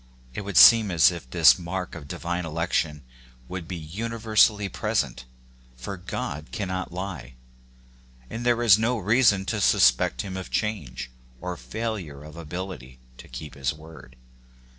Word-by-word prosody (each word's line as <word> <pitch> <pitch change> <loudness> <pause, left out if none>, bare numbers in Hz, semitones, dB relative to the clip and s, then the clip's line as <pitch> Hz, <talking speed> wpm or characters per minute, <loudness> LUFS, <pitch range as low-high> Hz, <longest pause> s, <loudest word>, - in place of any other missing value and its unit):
It - - -4
would 100 -1 -3
seem 115 -3 +8
as 85 0 +5
if 85 -8 -9
this 80 +5 +6
mark 90 +1 -5
ol 85 - -7
divine 85 +5 -4
election 80 -2 -2 0.4
would 90 -2 -6
be 90 - -5
universally 110 +4 +1
present; 65 -7 -2 0.5
for 65 +11 -6
God 75 -4 -6
cannot 95 -4 -4
lie, 90 -9 -6 0.9
and 115 - -6
there 120 -1 +2
is 110 -3 +6
no 120 +2 +1
reason 105 -1 +3
to 105 0 -2
suspect 65 -5 +3
him 95 - -6
of 95 - -7
change, 65 - -3 0.3
or 90 0 -5
failure 100 -9 -5
of 75 0 -12
ability 85 -6 -7 0.2
to - - -12
keep 65 +4 -9
his 70 0 -2
word. 75 -5 -14
90 Hz, 145 wpm, -25 LUFS, 75-105 Hz, 0.9 s, seem